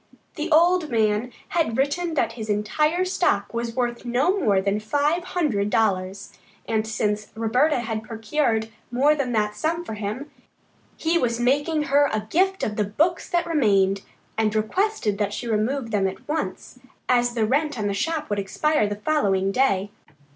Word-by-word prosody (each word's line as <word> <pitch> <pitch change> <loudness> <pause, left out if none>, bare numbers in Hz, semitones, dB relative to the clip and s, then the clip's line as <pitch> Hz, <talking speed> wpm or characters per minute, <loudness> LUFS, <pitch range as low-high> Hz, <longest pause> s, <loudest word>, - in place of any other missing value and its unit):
The 320 +1 -4
old 340 +1 +4
man 220 +1 +1 0.2
had 320 -10 0
written 320 +5 0
that 275 - +1
his 220 -2 -7
entire 300 - +1
stock 345 - 0
was 235 0 -3
worth 240 -2 -1
no 255 +10 +1
more 200 - +3
than 200 +2 0
five 290 +10 0
hundred 280 - 0
dollars, 190 -1 0 0.3
and 220 -1 0
since 210 -1 -1
Roberta 245 +5 +2
had 220 -2 -3
procured 225 +1 -1 0.2
more 270 +5 +3
than 275 -4 -2
that 210 -1 0
sum 330 +8 -1
for 220 - -5
him, 215 +8 -5 0.7
he 330 +1 +1
was 235 -3 0
making 290 +5 +1
her 285 0 +3
a 215 -1 -2
gift 380 +3 +2
of 210 - -2
the 210 - +2
books 315 - 0
that 345 -2 +1
remained, 200 - +2 0.4
and 215 -1 +1
requested 220 - 0
that 205 -1 0
she 240 - -5
remove 230 +3 -1
them 200 -2 +2
at 190 - -8
once, 310 +1 -4 0.3
as 245 -1 +2
the 225 -2 +2
rent 290 +4 0
on 210 - -2
the 200 - 0
shop 305 +8 -2
would 205 - 0
expire 215 +5 +1
the 205 - -3
following 200 -6 +1
day. 205 -5 +1
235 Hz, 170 wpm, -24 LUFS, 210-300 Hz, 0.7 s, old